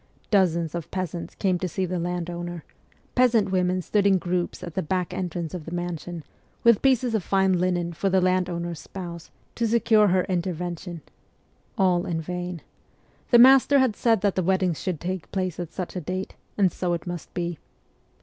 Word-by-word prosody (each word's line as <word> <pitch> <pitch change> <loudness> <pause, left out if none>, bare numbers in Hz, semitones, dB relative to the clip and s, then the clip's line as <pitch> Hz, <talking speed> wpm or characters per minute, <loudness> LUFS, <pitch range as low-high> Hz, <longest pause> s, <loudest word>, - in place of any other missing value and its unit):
Dozens 170 -6 +2
of 170 -2 -5
peasants 180 -2 -4
came 185 -3 +1
to 185 - -1
see 185 +2 -2
the 180 0 -2
landowner; 175 -1 -4 0.5
peasant 235 -6 +3
women 185 -1 +1
stood 205 +2 +2
in 195 -1 +5
groups 175 0 -2
at 170 - -6
the 190 - -1
back 180 +2 -2
entrance 175 -3 -3
of 175 -4 -6
the 165 - -7
mansion, 175 -1 -4 0.4
with 235 -3 +5
pieces 255 -3 +2
of 220 - +1
fine 190 +1 +2
linen 175 -1 0
for 195 +4 0
the 190 0 +3
landowner's 180 -2 0
spouse, 170 -2 -8 0.2
to 235 - 0
secure 220 -2 +4
her 185 -1 +3
intervention. 175 -1 -3 0.7
All 180 -3 +2
in 165 -2 -1
vain. 180 0 -5 0.7
The 240 - +7
master 270 +3 +7
had 260 -5 +3
said 225 -4 +2
that 200 -2 +2
the 185 - 0
weddings 185 -2 +1
should 180 -5 -2
take 185 -1 -4
place 185 -3 -2
at 175 -2 -5
such 185 -1 -5
a 180 - -2
date, 185 +4 -4 0.2
and 195 -3 +4
so 180 -1 -1
it 170 - -3
must 175 -2 -6
be. 175 -2 -3
180 Hz, 180 wpm, -25 LUFS, 175-190 Hz, 0.7 s, The